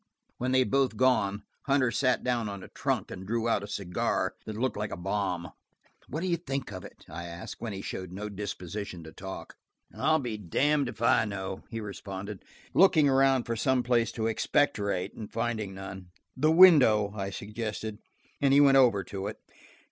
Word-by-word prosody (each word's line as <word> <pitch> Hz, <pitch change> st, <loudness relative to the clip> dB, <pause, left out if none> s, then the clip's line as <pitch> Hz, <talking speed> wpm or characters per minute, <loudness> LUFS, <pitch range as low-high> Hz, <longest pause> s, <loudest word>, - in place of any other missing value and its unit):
When 125 Hz, +1 st, -1 dB
they 130 Hz, -, +4 dB
had -, -, -6 dB
both 135 Hz, -5 st, +2 dB
gone, 105 Hz, -6 st, +2 dB, 0.2 s
Hunter 135 Hz, -3 st, +3 dB
sat 130 Hz, 0 st, +1 dB
down 120 Hz, -4 st, 0 dB
on 100 Hz, -2 st, -7 dB
a -, -, -9 dB
trunk -, -, -2 dB
and 95 Hz, +1 st, -8 dB
drew 115 Hz, +1 st, 0 dB
out 115 Hz, -3 st, +2 dB
a 100 Hz, -, -7 dB
cigar 95 Hz, -3 st, -1 dB
that 110 Hz, -1 st, -5 dB
looked 130 Hz, +3 st, 0 dB
like 105 Hz, 0 st, -3 dB
a -, -, -5 dB
bomb. 90 Hz, -2 st, -2 dB, 0.6 s
"What 155 Hz, +5 st, -3 dB
do 185 Hz, -, -1 dB
you 170 Hz, -1 st, +1 dB
think 135 Hz, -5 st, -4 dB
of -, -, -7 dB
it?" -, -, -13 dB
I 85 Hz, -, -7 dB
asked, 85 Hz, +1 st, -8 dB
when 115 Hz, -, -3 dB
he 95 Hz, -1 st, -6 dB
showed 95 Hz, -2 st, -5 dB
no 100 Hz, +3 st, -5 dB
disposition 100 Hz, -2 st, -6 dB
to 80 Hz, -, -10 dB
talk. 95 Hz, +2 st, -8 dB, 0.4 s
"I'll 160 Hz, -, +3 dB
be 120 Hz, -7 st, -3 dB
damned 140 Hz, -, +1 dB
if 120 Hz, -1 st, -7 dB
I 115 Hz, -, +4 dB
know," 95 Hz, -2 st, -5 dB
he 115 Hz, -, -4 dB
responded, 100 Hz, -1 st, -7 dB, 0.3 s
looking 175 Hz, -6 st, +6 dB
around 135 Hz, -1 st, +4 dB
for 115 Hz, -, -3 dB
some 130 Hz, +2 st, +1 dB
place 120 Hz, -1 st, +2 dB
to 110 Hz, -, -2 dB
expectorate 105 Hz, -5 st, 0 dB
and 105 Hz, -, -8 dB
finding 110 Hz, -4 st, -2 dB
none. 95 Hz, -1 st, -8 dB, 0.3 s
"The 155 Hz, +4 st, +2 dB
window," 140 Hz, -, +7 dB
I 100 Hz, -2 st, -3 dB
suggested, 105 Hz, +1 st, -5 dB, 0.4 s
and 140 Hz, -1 st, +4 dB
he -, -, +7 dB
went 140 Hz, -1 st, +7 dB
over 115 Hz, -7 st, +5 dB
to 95 Hz, +2 st, -5 dB
it. -, -, -6 dB
110 Hz, 195 wpm, -29 LUFS, 100-130 Hz, 0.6 s, window